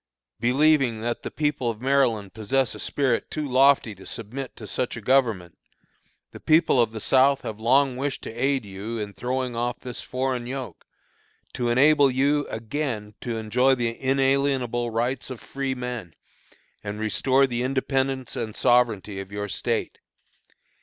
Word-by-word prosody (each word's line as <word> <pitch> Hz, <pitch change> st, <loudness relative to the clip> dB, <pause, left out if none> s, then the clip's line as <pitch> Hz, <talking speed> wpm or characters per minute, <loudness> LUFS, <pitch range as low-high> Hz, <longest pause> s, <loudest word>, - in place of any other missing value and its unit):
"Believing 130 Hz, -2 st, +3 dB
that 120 Hz, +1 st, -2 dB
the -, -, -5 dB
people 145 Hz, -5 st, -1 dB
of 110 Hz, -2 st, -4 dB
Maryland 125 Hz, -7 st, +1 dB
possess 125 Hz, +3 st, 0 dB
a -, -, -10 dB
spirit 130 Hz, -5 st, 0 dB
too 155 Hz, -1 st, -3 dB
lofty 130 Hz, -3 st, +4 dB
to 95 Hz, -1 st, -14 dB
submit 125 Hz, +4 st, -6 dB
to 110 Hz, -, -9 dB
such 125 Hz, +3 st, -3 dB
a -, -, -4 dB
Government, 115 Hz, -8 st, +1 dB, 0.7 s
the -, -, -11 dB
people 155 Hz, -5 st, +4 dB
of 115 Hz, -2 st, +1 dB
the 110 Hz, -, -6 dB
South 135 Hz, +4 st, +4 dB
have 110 Hz, -1 st, -6 dB
long 130 Hz, +3 st, +3 dB
wished 140 Hz, +1 st, -3 dB
to -, -, -6 dB
aid 135 Hz, 0 st, 0 dB
you 100 Hz, +4 st, -6 dB
in 105 Hz, -2 st, -5 dB
throwing 125 Hz, +2 st, -2 dB
off 120 Hz, +1 st, -2 dB
this 125 Hz, -2 st, -6 dB
foreign 125 Hz, -1 st, -2 dB
yoke, 130 Hz, 0 st, -6 dB, 0.7 s
to 120 Hz, -1 st, -1 dB
enable 140 Hz, +3 st, +5 dB
you 140 Hz, +3 st, +1 dB
again 115 Hz, -2 st, -4 dB
to 120 Hz, -2 st, -3 dB
enjoy 125 Hz, +5 st, +2 dB
the 120 Hz, -2 st, 0 dB
inalienable 135 Hz, -3 st, +1 dB
rights 120 Hz, +4 st, -2 dB
of 130 Hz, -3 st, -7 dB
freemen, 125 Hz, -9 st, -4 dB, 0.7 s
and 105 Hz, 0 st, -5 dB
restore 130 Hz, +5 st, +2 dB
the 120 Hz, -2 st, -2 dB
independence 135 Hz, 0 st, -1 dB
and 115 Hz, -4 st, -4 dB
sovereignty 110 Hz, -5 st, +2 dB
of 95 Hz, 0 st, -8 dB
your 105 Hz, 0 st, -4 dB
State. -, -, -2 dB
125 Hz, 155 wpm, -25 LUFS, 115-135 Hz, 0.7 s, enable